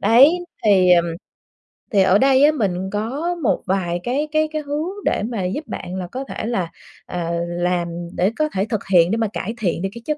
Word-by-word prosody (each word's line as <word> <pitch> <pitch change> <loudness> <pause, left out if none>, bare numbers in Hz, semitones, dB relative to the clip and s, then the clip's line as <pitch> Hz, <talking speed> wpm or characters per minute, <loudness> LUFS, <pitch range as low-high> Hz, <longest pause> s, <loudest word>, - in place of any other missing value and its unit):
Đấy, 275 +10 +6 0.3
thì, 190 -4 +5
ờm, 170 -1 +5 0.9
thì 200 - +4
ở 190 +1 +5
đây 270 +2 +4
á, 300 - +7
mình 190 -9 -1
có 270 +12 -2
một 225 - +1
vài 180 -2 -1
cái 280 +5 -1
cái 310 0 +2
cái 310 -1 -2
hướng 295 +4 -3 0.2
để - - +1
mà 220 -4 -3
giúp 215 +13 -3
bạn 180 0 -6
là 185 -1 -4
có 260 +9 -5
thể - - -6
là, 190 -8 -2 0.3
ờ, 170 -1 -3 0.2
làm, 175 0 -1 0.3
để 190 +4 +2
có 305 0 +1
thể 195 +1 0
thực 220 -4 -1
hiện 175 0 +5
để 225 - +1
mà 225 -1 +1
cải 220 +5 -3
thiện 180 -6 -1
được 195 - -1
cái 235 - -9
chất 305 -1 -1
210 Hz, 220 wpm, -21 LUFS, 180-275 Hz, 0.9 s, á